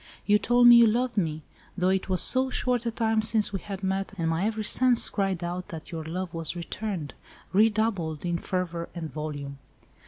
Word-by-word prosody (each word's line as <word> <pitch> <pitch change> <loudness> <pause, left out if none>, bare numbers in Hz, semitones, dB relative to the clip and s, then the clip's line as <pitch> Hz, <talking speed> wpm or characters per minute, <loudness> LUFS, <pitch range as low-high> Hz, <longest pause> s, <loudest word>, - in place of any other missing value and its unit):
You 210 0 +4
told 245 +3 +3
me 240 0 +9
you 235 -1 +7
loved 245 +3 0
me—though 175 +1 -3
it 190 0 -1
was 185 -1 +3
so 260 +1 +3
short 250 -2 0
a - - +2
time 225 -1 0
since 215 -1 0
we 195 - -2
had 195 +1 -8
met, 195 +1 -2
and 165 -2 -1
my 165 +4 -1
every 220 0 -2
sense 250 +2 +4
cried 195 -4 -2
out 175 +1 -4
that 160 -2 -9
your 165 -2 -5
love 175 +2 -5
was 165 +1 -3
returned—redoubled 195 0 -2
in 170 -1 -1
fervour 170 -2 -3
and 160 -3 -6
volume." 145 -2 -6
190 Hz, 185 wpm, -26 LUFS, 170-220 Hz, -, me